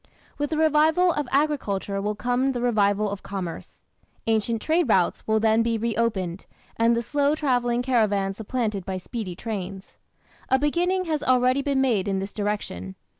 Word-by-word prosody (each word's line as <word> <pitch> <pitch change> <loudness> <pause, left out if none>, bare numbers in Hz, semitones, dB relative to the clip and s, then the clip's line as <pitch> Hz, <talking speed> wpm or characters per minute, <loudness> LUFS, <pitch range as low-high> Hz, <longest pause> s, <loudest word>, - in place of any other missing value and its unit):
With 290 0 -1
the 315 - -2
revival 315 +3 +4
of 295 -3 -2
agriculture 215 -9 0
will 210 +1 -2
come 250 +5 0
the 245 - -3
revival 210 -3 +2
of 200 - -5
commerce. 185 -4 -7 0.4
Ancient 225 0 +1
trade 320 +3 +1
routes 185 -4 +2
will 220 0 +3
then 220 +1 +3
be 230 0 +1
reopened, 215 -5 -1 0.3
and 230 +1 +3
the 235 - -1
slow 285 +4 +1
travelling 245 -5 +1
caravans 205 -6 +1
supplanted 220 -3 -2
by 190 0 -4
speedy 185 -1 -5
trains. 195 -2 -6 0.5
A 265 - +4
beginning 350 +6 +1
has 310 -3 -1
already 255 0 +3
been 275 -1 +1
made 225 -8 +1
in 195 -1 0
this 195 +1 -4
direction. 200 - -3
230 Hz, 165 wpm, -25 LUFS, 200-270 Hz, 0.5 s, revival